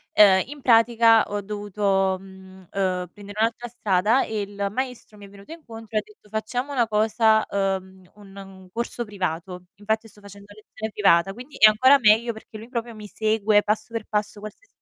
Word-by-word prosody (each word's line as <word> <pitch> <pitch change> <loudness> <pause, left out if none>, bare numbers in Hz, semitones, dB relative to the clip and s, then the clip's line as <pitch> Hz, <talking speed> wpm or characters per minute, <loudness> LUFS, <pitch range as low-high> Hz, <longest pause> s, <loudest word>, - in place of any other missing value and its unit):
uhm, 195 -3 +7
in 290 +1 -10
pratica 230 -2 +5
ho 205 - -2
dovuto, 200 -2 -1
mhmm, 190 -1 -15
uhm, 185 -2 -2
prendere 205 0 -10
un'altra 230 +2 -1
strada 215 +1 +1
e 215 -1 -3
il 200 0 -4
maestro 250 -1 -5
mi 200 -1 -12
è - - -17
venuto 200 +8 -13
incontro 225 -9 -12
e - - +4
ha - - -4
detto: 425 - -22
"Facciamo 245 +6 -4
una 240 -4 +1
cosa, 220 +1 +2
uhm, 190 -2 -3
un 200 -2 -16
un 190 -1 -12
corso 235 +1 -4
privato." 180 -3 -5
Infatti 220 +2 -3
sto 210 - -20
facendo 200 0 -14
lezione 215 +1 -8
privata, 195 -3 +3
quindi 250 +7 -12
è 215 - +8
ancora 260 +6 +5
meglio, 230 -1 +3
perché 220 0 -12
lui 220 +2 -11
proprio 235 -2 -5
mi 210 -1 -10
segue 215 0 +1
passo 215 +2 -2
per 230 - -3
passo, 210 -1 -3
qualsis 215 - -11
210 Hz, 185 wpm, -23 LUFS, 195-225 Hz, -, è